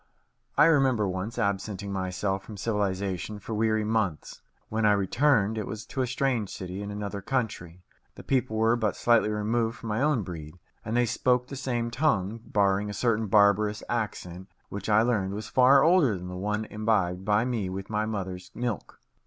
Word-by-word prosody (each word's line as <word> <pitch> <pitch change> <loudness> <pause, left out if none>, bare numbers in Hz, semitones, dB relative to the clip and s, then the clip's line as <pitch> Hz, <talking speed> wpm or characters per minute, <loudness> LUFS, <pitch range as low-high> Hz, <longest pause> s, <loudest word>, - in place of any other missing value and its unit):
I - - +7
remember 135 -9 +3
once 95 +5 -4
absenting 100 -2 -2
myself 95 +1 -2
from 105 - -10
civilization 100 -1 -2
for 105 +2 -7
weary 110 0 +1
months. 105 -7 -2 0.3
When 110 0 -2
I 105 -1 +5
returned, 110 +1 +2
it 110 - -4
was 110 +1 -6
to 135 - -3
a 130 - 0
strange 125 -4 0
city 95 +1 -6
in 100 - -5
another 100 -1 -5
country. 95 -8 -3 0.3
The - - -11
people 125 -4 0
were 115 +1 +3
but 110 -3 0
slightly 115 -2 +3
removed 115 +2 -1
from 115 0 -7
my 105 +3 0
own 145 -6 +2
breed, 80 -2 -8 0.3
and 115 +2 -2
they 120 - +4
spoke 125 +2 +1
the 140 - -6
same 120 -3 -2
tongue, 115 -6 0
barring 100 -1 +1
a 105 - -5
certain 115 0 +1
barbarous 105 +1 +3
accent 95 -5 -4 0.2
which 100 +1 -5
I 110 +1 +5
learned 100 -5 0
was 110 +1 -6
far 135 +2 +6
older 160 - +4
than 90 0 -7
the 90 - -6
one 105 +3 -2
imbibed 105 -5 0
by 105 +3 +2
me 115 -7 -2
with 95 +2 -6
my 105 0 0
mother's 95 -4 -5
milk. 120 -4 -4
105 Hz, 185 wpm, -27 LUFS, 100-115 Hz, 0.3 s, I